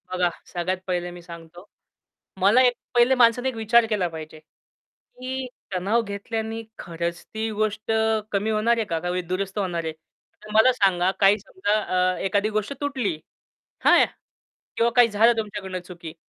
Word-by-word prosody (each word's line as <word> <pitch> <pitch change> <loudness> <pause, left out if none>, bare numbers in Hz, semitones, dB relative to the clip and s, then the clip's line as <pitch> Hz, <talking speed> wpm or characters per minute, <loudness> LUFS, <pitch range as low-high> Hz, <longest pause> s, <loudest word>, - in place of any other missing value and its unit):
बघा 180 -1 +1 0.2
सगळ्यात 180 +2 -1
पहिले 175 -1 -2
मी 175 0 -11
सांगतो. 170 +1 -12 0.8
मला 205 +7 +5
एक 250 -1 +4 0.2
पहिले 240 +2 +5
माणसाने 245 +1 +4
एक 255 - -7
विचार 225 +1 +4
केला 205 -5 +1
पाहिजे. 155 -1 -9
की 255 +10 -10 0.3
तणाव 200 +6 +1
घेतल्याने 220 +2 -4 0.2
खरंच 170 0 -4
ती 220 +1 -4
गोष्ट 215 +1 -2 0.4
कमी 205 +2 0
होणारे 225 +2 +2
का? 165 -5 -2
का 175 +2 -4
वी 180 +1 -1
दुरुस्त 190 +3 -3
होणार 175 -4 -2
आहे? 160 - -2 0.5
तर 215 - -12
मला 220 +4 +6
सांगा 190 -5 +2
काही 200 +1 +5
समजा 205 0 -2 0.4
अ, - - -7
एखादी 200 +2 0
गोष्ट 215 +4 -2
तुटली, 255 - -2 0.7
हां? - - +7 0.7
किंवा 230 +1 +3
काही 245 -2 +7
झालं 225 +3 +4
तुमच्याकडून 200 -4 -4
चुकी, 175 -3 -10
205 Hz, 155 wpm, -24 LUFS, 180-225 Hz, 0.8 s, हां